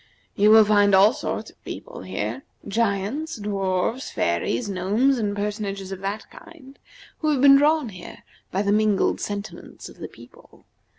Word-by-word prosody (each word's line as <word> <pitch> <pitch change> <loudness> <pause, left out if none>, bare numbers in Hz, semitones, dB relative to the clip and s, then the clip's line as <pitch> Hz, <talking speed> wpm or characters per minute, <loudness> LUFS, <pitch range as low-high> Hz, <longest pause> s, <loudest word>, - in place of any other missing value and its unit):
You 205 +1 +4
will 220 0 +8
find 205 -1 +4
all 200 +4 +6
sorts - - -5
of - - -35
people - - -8
here: - - -4 0.3
giants, 225 +8 -1
dwarfs, 200 +3 -2
fairies, 85 - -1
gnomes, 210 +8 +1
and 205 -2 -1
personages 200 -2 -4
of 190 - -6
that 200 +2 -5
kind, 275 -4 -15 0.4
who 310 - 0
have 290 -3 +1
been 275 +1 +8
drawn 300 -2 +2
here 180 -3 -11 0.3
by 195 +2 -1
the 200 - +1
mingled 210 -1 +1
sentiments 205 0 -7
of - - -16
the - - -6
people. - - -18
210 Hz, 160 wpm, -23 LUFS, 195-255 Hz, 0.4 s, will